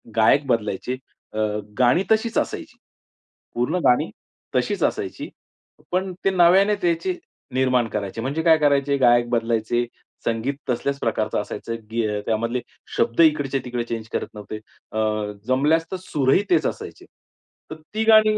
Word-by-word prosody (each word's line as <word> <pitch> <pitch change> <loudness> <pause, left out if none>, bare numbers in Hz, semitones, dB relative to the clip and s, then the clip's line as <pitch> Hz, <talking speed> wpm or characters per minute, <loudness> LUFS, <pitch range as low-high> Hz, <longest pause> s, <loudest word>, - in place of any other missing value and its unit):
गायक 115 +6 +4
बदलायचे, 115 0 -1 0.4
अ, 110 - -3 0.4
गाणी 125 +9 +4
तशीच 220 +1 +2
असायची. - - -2 0.8
पूर्ण 125 +8 0
गाणी 125 - +4 0.5
तशीच - - 0
असायची - - -2 0.6
पण 185 +1 0
ते - - +5
नव्याने 190 +3 +5
त्याचे 170 +1 +1 0.4
निर्माण 130 -2 +2
करायचे, 105 +1 -4
म्हणजे 140 +6 -1
काय 165 -2 +6
करायचे, 140 -2 +2
गायक 120 -2 +4
बदलायचे, 115 0 0 0.4
संगीत 115 +5 -1
तसल्याच 140 +3 -1
प्रकारचं - - 0
असायचं, 115 - -5 0.2
गी 115 0 0
अ, 105 -1 -2
त्यामधले 115 +3 0 0.4
शब्द 115 - +2
इकडचे-तिकडे 135 -6 +2
चेंज 115 -1 -5
करत - - -1
नव्हते. 105 0 -7 0.3
अ, 110 - -2 0.5
जमल्यास 150 +6 +3
तर 190 - -2
सुर 135 -6 +1
ही 200 - +3
तेच 350 - +3
असायचे, - - -7 0.7
तर - - -4 0.2
ती 220 +1 0
गाणी 215 -1 +6
130 Hz, 140 wpm, -23 LUFS, 115-165 Hz, 0.8 s, काय